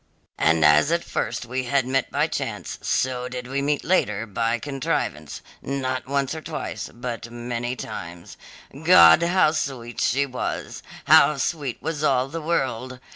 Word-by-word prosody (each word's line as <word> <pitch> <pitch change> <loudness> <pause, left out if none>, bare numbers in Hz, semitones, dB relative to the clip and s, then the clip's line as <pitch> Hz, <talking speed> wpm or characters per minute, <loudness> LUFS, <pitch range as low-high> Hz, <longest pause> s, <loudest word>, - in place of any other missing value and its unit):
And 80 0 +3
as 75 - +5
at 170 0 +1
first - - -3
we 130 +2 -3
had 140 0 +1
met 130 0 0
by - - +1
chance, - - -4
so 125 -1 -1
did 125 -1 -6
we 135 +2 -2
meet 145 +1 0
later 115 - +1
by 115 +3 -1
contrivance, 120 - -3 0.2
not 130 -2 -3
once 140 0 -1
or 160 - -6
twice, - - -5
but 120 -1 -6
many 120 +1 -4
times. 85 -8 -8 0.5
God, 85 -1 +8
how 170 -2 +3
sweet 130 -6 -4
she 140 +4 +2
was! 130 -2 -5 0.2
How 150 -1 +6
sweet 140 -3 -3
was 155 -1 -3
all 130 -2 +2
the 165 +3 -5
world! 130 -5 -2
130 Hz, 155 wpm, -23 LUFS, 120-140 Hz, 0.5 s, God